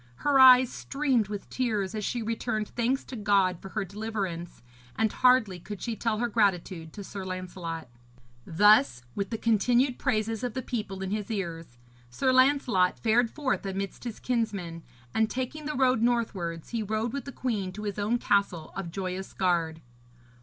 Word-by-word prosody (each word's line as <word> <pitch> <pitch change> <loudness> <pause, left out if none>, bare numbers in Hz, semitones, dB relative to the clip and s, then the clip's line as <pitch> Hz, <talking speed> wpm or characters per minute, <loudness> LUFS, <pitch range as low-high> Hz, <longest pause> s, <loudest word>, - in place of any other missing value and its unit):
Her 285 -2 +4
eyes 255 -1 +8
streamed 270 -7 0
with 205 -1 -6
tears 215 -7 -1
as 215 -1 -3
she 235 +3 -2
returned 220 -1 -2
thanks 245 +3 0
to 260 - -9
God 200 -5 +2
for 195 - -8
her 205 0 -2
deliverance, 195 - -5 0.3
and 220 -1 +1
hardly 230 -8 +3
could 200 +3 -8
she 230 -2 -3
tell 225 -1 -1
her 240 +2 0
gratitude 185 -7 0
to 205 - -7
Sir 195 0 -7
Lancelot. 180 -4 -5 0.6
Thus, 205 - +4
with 200 -1 -3
the 225 - -3
continued 240 +4 +2
praises 225 -2 0
of 245 -3 -3
the 260 - -3
people 210 -6 -4
in 190 - -4
his 210 +1 -3
ears, 165 - -4 0.3
Sir 255 - +1
Lancelot 255 -8 +3
fared 230 +1 +2
forth 280 -1 -2
amidst 195 0 -4
his 235 -3 -6
kinsmen, 200 -9 -2 0.3
and 220 0 +2
taking 260 +5 -4
the 300 - -3
road 255 -3 +3
northwards 200 -9 -1
he 230 -2 -2
rode 220 +2 -2
with 280 -3 -4
the 280 - -6
queen 215 -9 -2
to 210 +2 -7
his 205 -1 -3
own 215 +4 +1
castle 200 -8 0
of 195 -3 -4
Joyous 185 +1 -5
Gard. 165 -4 0
215 Hz, 175 wpm, -28 LUFS, 190-240 Hz, 0.6 s, eyes